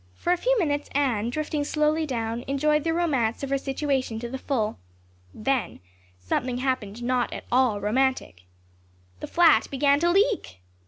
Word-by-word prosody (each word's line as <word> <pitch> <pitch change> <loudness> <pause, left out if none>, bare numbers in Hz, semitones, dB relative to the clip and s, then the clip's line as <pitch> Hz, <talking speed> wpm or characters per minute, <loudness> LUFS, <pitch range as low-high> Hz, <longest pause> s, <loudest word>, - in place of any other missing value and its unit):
For 350 - 0
a - - 0
few - - +1
minutes 290 -7 -1
Anne, 245 -6 +1
drifting 300 +2 -2
slowly 305 +2 0
down, 230 -2 -3
enjoyed 300 +2 +1
the 330 - 0
romance 280 -9 0
of 275 - -4
her 275 - +2
situation 270 -4 -2
to 240 - -5
the 265 +2 -5
full. 220 - -2 0.5
Then 260 - -2 0.4
something 245 - -2
happened 245 -4 -2
not 250 0 0
at - - -7
all 245 -4 +3
romantic. 215 - -1 0.7
The - - -6
flat 340 -1 +4
began 280 +1 +2
to 340 +2 +2
leak. 395 - +1
270 Hz, 160 wpm, -25 LUFS, 240-300 Hz, 0.7 s, flat